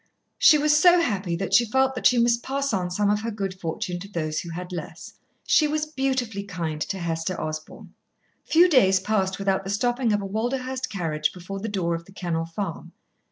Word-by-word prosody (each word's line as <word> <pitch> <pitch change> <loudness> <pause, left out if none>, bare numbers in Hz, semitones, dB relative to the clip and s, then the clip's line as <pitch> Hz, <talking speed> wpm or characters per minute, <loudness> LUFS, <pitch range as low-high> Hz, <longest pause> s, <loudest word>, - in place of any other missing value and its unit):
She 310 - +7
was 300 0 +3
so 350 +3 +6
happy 200 - -1
that 195 +3 -4
she 240 - +7
felt 265 +3 +1
that 250 - +3
she 250 - +3
must 235 0 +3
pass 275 0 -2
on 180 -2 -1
some 205 +3 +1
of 210 0 0
her 230 - -3
good 200 -3 -3
fortune 175 +1 -4
to 200 - -8
those 155 -5 -3
who 170 - -7
had 180 +2 -6
less. 165 -2 -7 0.3
She 305 - +4
was 305 +1 -1
beautifully 260 -8 -2
kind 165 -5 -4
to 195 - -2
Hester 170 0 -3
Osborn. 155 0 -7 0.5
Few 345 +3 +5
days 195 - +4
passed 195 -1 0
without 195 -1 0
the 195 - -6
stopping 240 +3 0
of 205 - +2
a 200 - -5
Walderhurst 255 +5 -2
carriage 155 -5 -1
before 185 +2 -7
the 225 +3 -4
door 180 -4 -1
of 170 0 -5
The 195 - -17
Kennel 170 -4 -2
Farm. 170 +1 -6
200 Hz, 205 wpm, -24 LUFS, 175-250 Hz, 0.5 s, She